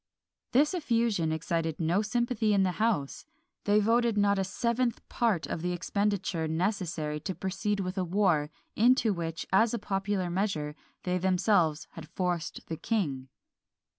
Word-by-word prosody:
This 290 +7 +4
effusion 230 - +1
excited 160 0 -2
no 170 +4 +2
sympathy 225 -1 +1
in 195 - +4
the 185 - +2
house. 210 -12 0 0.4
They 205 +1 +4
voted 230 +1 +2
not 200 -1 +3
a - - +2
seventh 235 +5 -1
part 220 -9 +1
of 160 - -4
the 180 +1 -1
expenditure 190 -3 -1
necessary 160 -3 -1
to 190 +4 -4
proceed 195 +2 -2
with 185 +1 -3
a - - +1
war, 175 -5 +2 0.3
into 235 -1 +4
which, 165 -2 -4
as 225 +4 +4
a - - -1
popular 195 -3 -2
measure, 170 -6 -1 0.3
they 180 0 0
themselves 180 -4 +2
had - - -10
forced 175 -3 -2
the 160 - -5
king. 150 - -2
190 Hz, 150 wpm, -29 LUFS, 165-215 Hz, 0.4 s, This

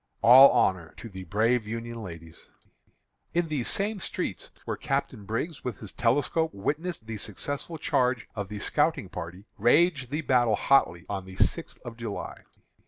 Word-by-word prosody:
All 130 +4 +10
honor 95 -9 +1
to 115 - -9
the 95 -2 -9
brave 110 +5 +1
Union 115 +1 -5
ladies." 85 -4 -10 0.9
In 170 -1 +1
these 140 -6 -1
same 205 +1 0
streets, - - -4 0.2
where - - -2
Captain 135 -6 -3
Briggs 130 - -3
with 125 - -4
his 105 -4 -5
telescope 145 +6 +1
witnessed 150 - -3
the 110 -1 -5
successful 145 - -4
charge 125 -4 0
of 100 -3 -5
the 105 - -5
scouting 145 - 0
party, 90 +2 -7
raged 130 - +3
the 150 +3 -2
battle 120 -6 +3
hotly 100 -9 +2
on 95 -2 -4
the 95 0 -11
sixth - - 0
of 115 -1 -8
July. 115 -4 -6
115 Hz, 160 wpm, -27 LUFS, 100-145 Hz, 0.9 s, All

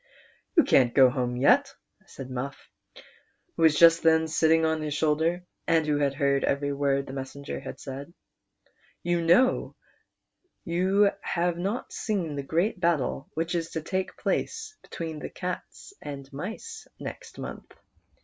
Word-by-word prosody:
"You 330 - +8
can't 125 -3 +3
go 130 -2 +7
home 125 -2 -1
yet," 270 - +3 0.3
said 130 -1 -9
Muff, 130 +2 -6 0.8
who - - -4
was 160 -2 +6
just 165 0 +7
then 160 0 +4
sitting 160 0 +3
on 160 0 0
his 150 -1 -3
shoulder, 160 +4 +1 0.2
and 165 -1 +3
who 150 -1 +1
had 140 -1 +1
heard 140 0 +1
every 140 0 0
word 140 -1 +1
the 135 - -8
messenger 135 +1 -6
had 135 - -8
said; 135 +4 -7 0.5
" - - -37
you 175 -1 +2
know 180 +11 +3 0.9
you 190 +4 +3
have 175 -1 -1
not 200 +7 -3
seen 180 -9 -2
the 140 - -2
great 170 +9 0
battle 160 -5 0
which 165 +2 -1
is 165 -1 -1
to 160 - -2
take 190 +2 -3
place 435 -2 -2
between 160 -2 -6
the - - -6
cats 180 - -6
and 140 -2 -7
mice 215 - -7
next - - -8
month. - - -8
160 Hz, 155 wpm, -27 LUFS, 140-175 Hz, 0.9 s, You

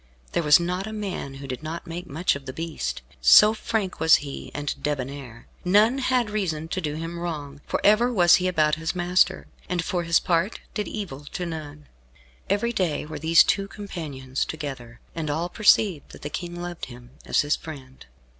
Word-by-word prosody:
There - - +1
was 150 -1 +6
not 180 +3 -2
a 220 - -6
man 195 -10 -4
who 135 0 -8
did 130 0 -5
not 160 +2 -6
make 175 +2 -6
much 165 +4 0
of 140 -1 -9
the 130 - -5
beast, 160 - -4 0.2
so 210 - +8
frank 215 -4 -2
was 160 0 +7
he 140 -2 -5
and 145 0 -2
debonair. 135 -4 -4 0.2
None 210 +8 +4
had 250 -4 +1
reason 165 -7 -2
to 185 - -2
do 150 -3 -3
him 165 +2 -5
wrong, 150 -4 -5
for - - -1
ever 220 +4 +5
was 175 -6 +6
he 185 - -1
about 155 -4 +2
his 160 +3 -2
master, 180 +1 +2 0.2
and 175 -2 -1
for 180 - -1
his 170 -1 +3
part 180 +3 0
did 210 - -2
evil 150 -10 -6
to 180 - -3
none. 150 -3 -7 0.6
Every 205 +4 +1
day 180 -10 0
were 155 - -7
these 165 +1 +6
two 195 -1 0
companions 150 -11 -5
together, 135 -7 -6
and 160 -2 -3
all 165 +4 -1
perceived 200 -6 +3
that - - -12
the 145 - -5
King 175 +1 -5
loved 175 -1 -5
him 120 -1 -13 0.2
as - - +3
his 145 +1 +1
friend. 135 -4 -10
165 Hz, 190 wpm, -25 LUFS, 145-185 Hz, 0.6 s, so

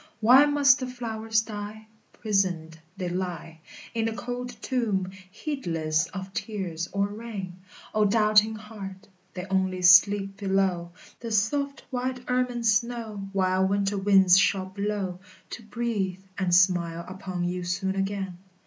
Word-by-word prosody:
Why 255 +6 +7
must 285 -2 +5
the 255 - -3
flowers 225 -3 -1
die? 215 0 -7 0.3
Prisoned 180 -7 -1 0.2
they 185 -2 -3
lie 175 -2 -4 0.3
In 225 -1 0
the 225 - -1
cold 245 +2 -5
tomb, 215 -8 -1 0.2
heedless 170 - -2
of 190 0 -8
tears 185 -7 -4
or 200 0 +1
rain. 205 -4 -7 0.3
O 215 -1 +3
doubting 215 +1 +4
heart! 210 -2 -9 0.3
They 180 0 -5
only 190 -1 0
sleep 195 +2 +6
below 190 -3 0 0.3
The 235 - -6
soft 280 +7 0
white 255 0 -3
ermine 250 -1 0
snow 220 -2 0
While 190 -1 +2
winter 200 0 0
winds 190 -2 +6
shall 190 0 +2
blow, 195 -1 -3 0.3
To - - -6
breathe 210 -5 -3
and 185 -2 -1
smile 175 -2 +3
upon 185 -1 -5
you 180 +1 -2
soon 190 +2 -2
again. 195 -2 -3
200 Hz, 135 wpm, -26 LUFS, 185-225 Hz, 0.3 s, Why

